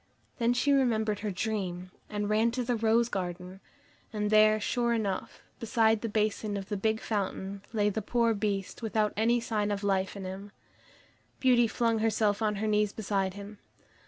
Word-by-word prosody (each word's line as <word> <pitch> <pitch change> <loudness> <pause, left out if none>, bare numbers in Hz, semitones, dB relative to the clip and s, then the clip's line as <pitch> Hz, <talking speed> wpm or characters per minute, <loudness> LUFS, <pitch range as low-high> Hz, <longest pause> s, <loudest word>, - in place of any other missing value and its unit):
Then 235 +1 +2
she 285 +4 +2
remembered 220 -6 +2
her 210 - -3
dream, 185 -3 -3 0.2
and 205 -1 -2
ran 215 +2 +3
to 250 0 -1
the 245 0 0
rose 225 +1 +2
garden, 180 -2 -5 0.5
and 210 -1 -2
there, 215 0 +5
sure 235 +2 0
enough, 205 -5 -3 0.2
beside 225 -1 +2
the 230 - -3
basin 210 -1 -1
of 195 0 -7
the 210 - -1
big 220 +2 0
fountain, 200 -2 -3
lay 210 -2 +1
the 220 - -2
poor 230 +2 +1
Beast 200 -1 -3
without 215 -2 0
any 235 +3 +2
sign 215 -3 -1
of 205 0 -2
life 195 -1 0
in 195 - -6
him. 195 +2 -7 0.9
Beauty 245 -3 +4
flung 230 0 0
herself 215 -1 +1
on 210 -1 +1
her 215 +2 -2
knees 210 -1 +2
beside 195 -3 -1
him. 205 +1 -9
215 Hz, 175 wpm, -29 LUFS, 200-225 Hz, 0.9 s, there